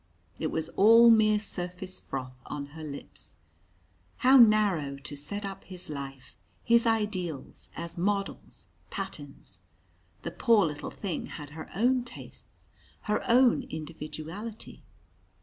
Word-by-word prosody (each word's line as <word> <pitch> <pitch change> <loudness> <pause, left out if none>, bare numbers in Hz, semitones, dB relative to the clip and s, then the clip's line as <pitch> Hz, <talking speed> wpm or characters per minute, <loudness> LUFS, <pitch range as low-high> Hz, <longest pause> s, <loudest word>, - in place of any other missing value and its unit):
It 160 - 0
was 160 0 -2
all 230 +5 +7
mere 215 -1 +5
surface 185 -2 -4
froth 130 -1 -6
on 145 -1 -4
her 160 0 -8
lips! 140 - -9 0.9
How 260 +1 +8
narrow 210 - +5
to 145 +1 -8
set 200 +9 -3
up 195 0 -7
his 180 -4 -8
life, 135 -2 -8 0.3
his 235 0 +4
ideals, 200 -9 -2
as 170 0 -6
models, 200 +2 -3 0.2
patterns! 145 - -7 0.6
The - - -4
poor 230 -6 +4
little 150 -2 -4
thing 195 -5 -4
had 150 -2 -9
her 160 +1 -8
own 245 +4 +3
tastes, 245 - -13 0.3
her 210 0 -1
own 245 +1 +5
individuality! 160 +7 -7
185 Hz, 125 wpm, -29 LUFS, 150-215 Hz, 0.9 s, How